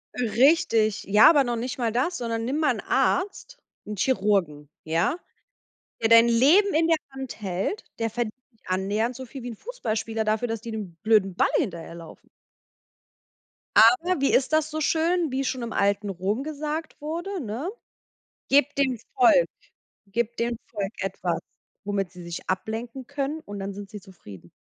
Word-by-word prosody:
Richtig, 230 -3 +3
ja, 210 +6 +7
aber 290 -4 +5
noch 240 -1 -2
nicht 245 +3 -4
mal 235 -3 0
das, 260 +10 0
sondern 230 -1 -3
nimm 265 +5 -1
mal 310 - +3
'n - - -6
Arzt, 415 +6 -1 0.3
'n 210 - -5
Chirurgen, 190 - 0 0.2
ja? 170 - 0 0.8
Der 225 - +2
dein 230 +1 +8
Leben 310 - +5
in 325 +1 +3
der 330 -1 +4 0.2
Hand 265 -4 -7
hält, 195 - -2
der 225 - 0
verdient 230 -1 -3 0.2
nicht 225 - -35
annähernd 205 +6 0
so 260 +1 -8
viel 260 +1 -9
wie 245 - -5
'n 225 - -8
Fußballspieler 225 - -3
dafür, 215 +3 0
dass 225 -1 -3
die 230 - -6
dem 210 -6 -6
blöden 210 -4 +3
Ball - - +3
hinterherlaufen. 170 -2 -6 1.5
Aber 300 +11 +5
wie 275 - +2
ist 265 +3 +2
das 310 0 +2
so 310 0 -3
schön, 330 0 +1
wie 270 +1 -1
schon 255 -1 -2
im 235 -1 -4
alten 200 0 +1
Rom 195 +7 -2
gesagt 310 +1 -5
wurde, 345 +6 -4
ne? 245 - -4 0.8
Gebt 285 0 +3
dem 260 -3 +1 0.2
Volk 385 +6 +5 0.6
gebt 235 +1 -2
dem 235 0 -1
Volk 200 -3 -3
etwas, 180 -3 -2 0.4
womit 200 -3 -2
sie 180 -2 -11
sich 170 +1 -7
ablenken 230 +6 -4
können 285 +3 -3
und 205 -7 -8
dann 195 +1 -4
sind 200 0 -9
sie 210 -2 -8
zufrieden. 105 - -14
230 Hz, 170 wpm, -25 LUFS, 205-285 Hz, 1.5 s, dein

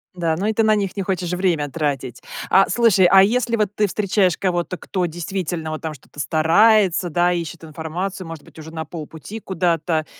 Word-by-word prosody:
Да, 165 -3 0
ну 190 +5 -3
и 220 - +1
ты 225 - +2
на 215 0 +4
них 200 -1 -2
не 195 - -1
хочешь 180 -2 -2
время 175 -5 0
тратить. 135 -5 -3 0.3
А, 195 - +5
слушай, 225 -6 +4
а 190 0 +7
если 235 +2 +1
вот 210 -3 +1
ты 210 0 +2
встречаешь 195 -2 +1
кого-то, 180 -1 -1
кто 185 0 -2
действительно 170 -1 -4
вот 155 - -5
там 160 -1 -4
что-то 145 +1 -15
старается, 180 +4 +3
да, 175 +2 +2
ищет 170 -2 -4
информацию, 165 +4 -5
может 165 -3 -8
быть, - - -16
уже 160 +1 -9
на 160 -1 -4
полпути 160 +6 -8
куда-то, 170 -4 -1
175 Hz, 195 wpm, -21 LUFS, 160-195 Hz, 0.3 s, а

